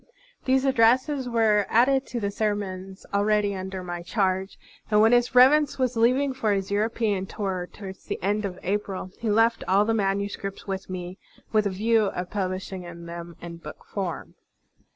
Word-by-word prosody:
These 265 Hz, +1 st, +2 dB
addresses 255 Hz, +2 st, +3 dB
were 220 Hz, -4 st, +3 dB
added 265 Hz, +3 st, +3 dB
to 240 Hz, -, -4 dB
the 200 Hz, -2 st, -2 dB
ser 210 Hz, 0 st, 0 dB
mons 190 Hz, -1 st, -7 dB
already 205 Hz, 0 st, +2 dB
tinder 190 Hz, -1 st, -5 dB
my 175 Hz, -1 st, -5 dB
charge, 190 Hz, +1 st, -1 dB, 0.3 s
and 210 Hz, -1 st, +4 dB
when 220 Hz, +2 st, +6 dB
His 245 Hz, 0 st, +3 dB
Reverence 280 Hz, +4 st, +6 dB
was 255 Hz, -2 st, 0 dB
leaving 255 Hz, +4 st, +3 dB
for 225 Hz, -5 st, 0 dB
his 195 Hz, 0 st, -2 dB
European 210 Hz, -2 st, 0 dB
tour 185 Hz, -4 st, -3 dB
towards 190 Hz, -2 st, -10 dB
the -, -, -3 dB
end 205 Hz, +3 st, 0 dB
of 185 Hz, -3 st, -4 dB
April, 195 Hz, -1 st, -3 dB
he 230 Hz, -, -2 dB
left 225 Hz, +2 st, +3 dB
all 195 Hz, +3 st, +4 dB
the 225 Hz, -, +1 dB
manu 200 Hz, -1 st, 0 dB
scripts 195 Hz, -1 st, -7 dB
with 195 Hz, -1 st, -5 dB
me 180 Hz, 0 st, -6 dB, 0.3 s
with 215 Hz, -2 st, +3 dB
a -, -, 0 dB
view 215 Hz, +3 st, +2 dB
of 180 Hz, -2 st, -4 dB
publishing 190 Hz, -1 st, -3 dB, 0.2 s
them 170 Hz, 0 st, -8 dB
in 170 Hz, -1 st, -7 dB
book 170 Hz, -, -11 dB
form. 190 Hz, -5 st, -4 dB
205 Hz, 175 wpm, -25 LUFS, 190-230 Hz, 0.3 s, when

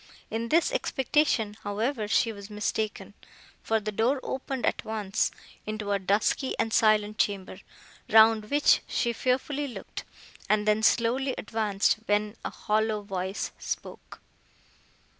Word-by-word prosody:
In 225 Hz, +1 st, -2 dB
this 335 Hz, -, +3 dB
expectation, 265 Hz, -, +1 dB
however, 215 Hz, +3 st, -2 dB
she 225 Hz, +2 st, +2 dB
was 200 Hz, 0 st, -10 dB
mistaken; 210 Hz, -1 st, -3 dB, 0.5 s
for 225 Hz, 0 st, +1 dB
the 215 Hz, 0 st, -4 dB
door 235 Hz, +7 st, +1 dB
opened 265 Hz, -1 st, -3 dB
at -, -, 0 dB
once, 210 Hz, -3 st, -1 dB, 0.4 s
into 215 Hz, -1 st, -3 dB
a 200 Hz, -, +2 dB
dusky 205 Hz, +7 st, 0 dB
and 225 Hz, -, -1 dB
silent 215 Hz, -2 st, +3 dB
chamber, 195 Hz, -2 st, -1 dB, 0.5 s
round 220 Hz, -1 st, +6 dB
which 290 Hz, 0 st, +4 dB
she 235 Hz, -1 st, 0 dB
fearfully 270 Hz, +4 st, -1 dB
looked, 250 Hz, -, -7 dB, 0.5 s
and 215 Hz, 0 st, +2 dB
then 215 Hz, 0 st, +3 dB
slowly 245 Hz, +4 st, +2 dB
advanced, 210 Hz, -2 st, 0 dB
when 210 Hz, +1 st, +1 dB
a -, -, -2 dB
hollow 215 Hz, 0 st, -1 dB
voice 190 Hz, 0 st, -3 dB
spoke. -, -, -6 dB
220 Hz, 130 wpm, -27 LUFS, 205-235 Hz, 0.5 s, round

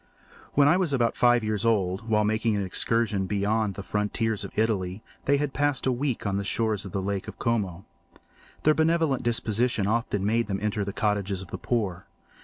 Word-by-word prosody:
When 140 Hz, 0 st, +6 dB
I 165 Hz, +5 st, +5 dB
was 180 Hz, -6 st, 0 dB
about 120 Hz, -3 st, +1 dB
five 120 Hz, -1 st, +4 dB
years 110 Hz, -2 st, -1 dB
old, 110 Hz, -1 st, 0 dB
while 105 Hz, -1 st, +3 dB
making 110 Hz, +1 st, +1 dB
an 100 Hz, -, 0 dB
excursion 105 Hz, +1 st, 0 dB
beyond 105 Hz, +1 st, 0 dB
the 100 Hz, -, -6 dB
frontiers 105 Hz, +2 st, -1 dB
of -, -, -9 dB
Italy, 105 Hz, -3 st, 0 dB, 0.2 s
they 140 Hz, +1 st, +3 dB
passed 145 Hz, 0 st, -1 dB
a 130 Hz, -, +3 dB
week 130 Hz, -1 st, -2 dB
on 100 Hz, -1 st, 0 dB
the 100 Hz, -, -1 dB
shores 110 Hz, -1 st, 0 dB
of 95 Hz, -, -7 dB
the 95 Hz, 0 st, -2 dB
Lake 100 Hz, -1 st, -2 dB
of -, -, -8 dB
Como. 100 Hz, -6 st, -1 dB, 0.8 s
Their 155 Hz, -, +5 dB
benevolent 160 Hz, -4 st, +2 dB
disposition 115 Hz, -2 st, +1 dB
often 105 Hz, -2 st, 0 dB
made 115 Hz, +2 st, +1 dB
them 95 Hz, -1 st, -1 dB
enter 105 Hz, 0 st, -1 dB
the 100 Hz, -, -3 dB
cottages 100 Hz, -2 st, -1 dB
of 90 Hz, -, -13 dB
the -, -, -5 dB
poor. 100 Hz, -7 st, -2 dB
110 Hz, 195 wpm, -26 LUFS, 100-120 Hz, 0.8 s, When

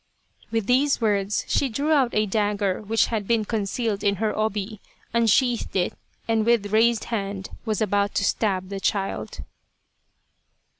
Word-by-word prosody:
With 225 Hz, -2 st, -1 dB
these 270 Hz, +5 st, +3 dB
words 205 Hz, -3 st, 0 dB
she 275 Hz, -, +1 dB
drew 280 Hz, +7 st, -1 dB
out 275 Hz, -5 st, +4 dB
a 215 Hz, 0 st, +3 dB
dagger 205 Hz, -2 st, 0 dB
which 215 Hz, +1 st, +2 dB
had 210 Hz, -3 st, -2 dB
been 230 Hz, -2 st, +2 dB
concealed 215 Hz, 0 st, -2 dB
in 200 Hz, 0 st, +2 dB
her 215 Hz, +2 st, -1 dB
obi* 215 Hz, -1 st, -2 dB, 0.3 s
unsheathed 235 Hz, +1 st, +2 dB
it, 180 Hz, -2 st, +1 dB, 0.3 s
and 225 Hz, -1 st, +2 dB
with 215 Hz, -3 st, +1 dB
raised 230 Hz, +1 st, +3 dB
hand 195 Hz, -2 st, -3 dB
was 215 Hz, -2 st, -1 dB
about 200 Hz, 0 st, 0 dB
to -, -, +1 dB
stab 190 Hz, -4 st, 0 dB
the 200 Hz, -1 st, -4 dB
child. 195 Hz, 0 st, -2 dB
215 Hz, 150 wpm, -24 LUFS, 200-230 Hz, 0.3 s, out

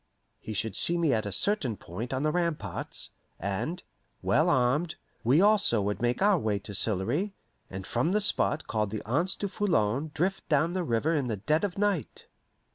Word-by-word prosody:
He 110 Hz, -, -7 dB
should 105 Hz, 0 st, -2 dB
see 175 Hz, -, +5 dB
me 165 Hz, -5 st, +2 dB
at 110 Hz, -2 st, -1 dB
a -, -, -4 dB
certain 135 Hz, -, +1 dB
point 105 Hz, +9 st, -7 dB
on 130 Hz, +1 st, -2 dB
the 155 Hz, -, +1 dB
ramparts, 170 Hz, -2 st, -3 dB, 0.3 s
and, 100 Hz, -, -3 dB, 0.4 s
well -, -, +2 dB
armed, 130 Hz, +7 st, +1 dB, 0.3 s
we 135 Hz, +9 st, +4 dB
also 205 Hz, -, +4 dB
would 105 Hz, +2 st, -2 dB
make 120 Hz, +8 st, 0 dB
our 200 Hz, -3 st, +4 dB
way 110 Hz, -6 st, -1 dB
to 100 Hz, +1 st, -8 dB
Sillery, 115 Hz, -, 0 dB, 0.3 s
and 95 Hz, 0 st, -7 dB
from 125 Hz, +9 st, 0 dB
the 210 Hz, -, +2 dB
spot 160 Hz, -6 st, +3 dB
called 105 Hz, -2 st, -1 dB
the 105 Hz, 0 st, -6 dB
Anse 165 Hz, -, +1 dB
du 200 Hz, -, -3 dB
Foulon 150 Hz, -, 0 dB
drift 185 Hz, +4 st, -2 dB
down 160 Hz, +3 st, +2 dB
the 185 Hz, -1 st, -1 dB
river 145 Hz, +3 st, 0 dB
in 145 Hz, -5 st, 0 dB
the 110 Hz, -3 st, -2 dB
dead 155 Hz, -, 0 dB
of 200 Hz, -3 st, -2 dB
night. 200 Hz, -6 st, -1 dB
145 Hz, 190 wpm, -28 LUFS, 110-175 Hz, 0.4 s, see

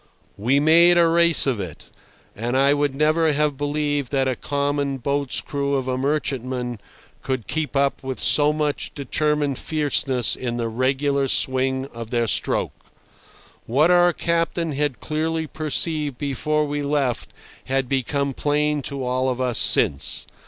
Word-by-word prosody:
We 125 Hz, +7 st, +1 dB
made 170 Hz, +3 st, +5 dB
a 170 Hz, -1 st, +5 dB
race 170 Hz, -1 st, +4 dB
of 130 Hz, -6 st, 0 dB
it, 90 Hz, -6 st, -8 dB, 0.4 s
and 120 Hz, +4 st, -2 dB
I 140 Hz, +1 st, +4 dB
would 145 Hz, -2 st, 0 dB
never 155 Hz, +2 st, +2 dB
have 150 Hz, 0 st, +1 dB
believed 145 Hz, -1 st, -2 dB
that 135 Hz, -2 st, +1 dB
a 130 Hz, -, 0 dB
common 140 Hz, +1 st, -2 dB
boat's 140 Hz, +1 st, -1 dB
crew 140 Hz, -1 st, -2 dB
of 130 Hz, -1 st, -2 dB
a 130 Hz, -, 0 dB
merchantman 130 Hz, -4 st, -2 dB, 0.4 s
could 130 Hz, -5 st, -3 dB
keep 155 Hz, -2 st, -3 dB
up 140 Hz, 0 st, +1 dB, 0.2 s
so 150 Hz, 0 st, +4 dB
much 150 Hz, -1 st, -2 dB
determined 145 Hz, 0 st, -1 dB
fierceness 145 Hz, -5 st, +1 dB
in 120 Hz, -2 st, -4 dB
the 115 Hz, -1 st, -2 dB
regular 135 Hz, +3 st, 0 dB
swing 130 Hz, 0 st, 0 dB
of 115 Hz, -1 st, -7 dB
their 120 Hz, -1 st, 0 dB
stroke. 110 Hz, -, -1 dB, 0.8 s
What 150 Hz, +9 st, +3 dB
our 175 Hz, 0 st, +5 dB
captain 170 Hz, -1 st, -1 dB
had 140 Hz, -5 st, -2 dB
clearly 160 Hz, +1 st, -2 dB
perceived 155 Hz, -1 st, -2 dB
before 150 Hz, +3 st, -1 dB
we 145 Hz, 0 st, -3 dB
left 140 Hz, -4 st, -1 dB, 0.4 s
had 135 Hz, 0 st, -1 dB
become 140 Hz, +2 st, -1 dB
plain 150 Hz, +1 st, 0 dB
to 140 Hz, -1 st, -5 dB
all 130 Hz, +1 st, 0 dB
of 125 Hz, -1 st, -3 dB
us 125 Hz, -3 st, +1 dB
since. 70 Hz, -, +2 dB
140 Hz, 150 wpm, -22 LUFS, 130-150 Hz, 0.8 s, made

